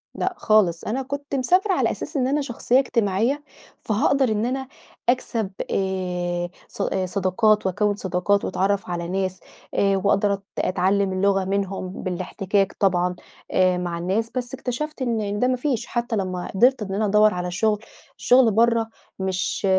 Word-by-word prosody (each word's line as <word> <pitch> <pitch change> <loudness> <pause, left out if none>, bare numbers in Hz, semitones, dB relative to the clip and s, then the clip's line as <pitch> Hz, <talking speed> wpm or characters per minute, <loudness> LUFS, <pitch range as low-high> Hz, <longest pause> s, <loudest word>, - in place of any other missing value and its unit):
لأ 375 - -1
خالص. 190 -6 +3
أنا 255 +5 -2
كنت 280 +1 -5
مسافرة 365 +9 +2
على - - +2
أساس 300 - -5
إن 255 -1 +1
أنا 290 +2 +1
شخصية 250 -1 +1
اجتماعية، 235 +3 0 0.4
فهاقدر 250 +4 +2
إن 215 +1 0
أنا 265 +1 -2 0.4
أكسب 230 -5 0 0.2
آآ 180 -2 -1 0.2
ص - - -7 0.2
صداقات 200 +3 +2
وأكوِّن 205 +2 +1
صداقات 190 +1 0
وأتعرّف 195 0 0
على 170 -1 -3
ناس، 185 0 -2 0.3
آآ 195 -1 +2
وأقدر 200 0 +3
أت 195 0 -5 0.2
أتعلّم 190 +1 +1
اللغة 195 0 +2
منهم 195 -1 -2
بالاحتكاك 190 +2 -1
طبعًا 180 -2 +2 0.4
آآ، 185 -1 +3
مع 175 -1 -3
الناس، 195 +7 -1
بس 245 0 -3
اكتشفت 270 +3 -4
إن 215 -4 -1
ده 250 - +3
ما 255 - +2
فيش 250 -3 -1
حتى 240 -1 -2
لمّا 185 -3 -2
قدرت 250 +3 +4
إن 195 -2 -4
أنا 215 +1 +1
أدَوّر 210 0 +4
على 180 0 -3
شغل، 210 +3 +1 0.4
الشغل 250 -3 +5
برا 230 +1 +3 0.3
مش 190 +1 -1
205 Hz, 155 wpm, -23 LUFS, 185-240 Hz, 0.4 s, الشغل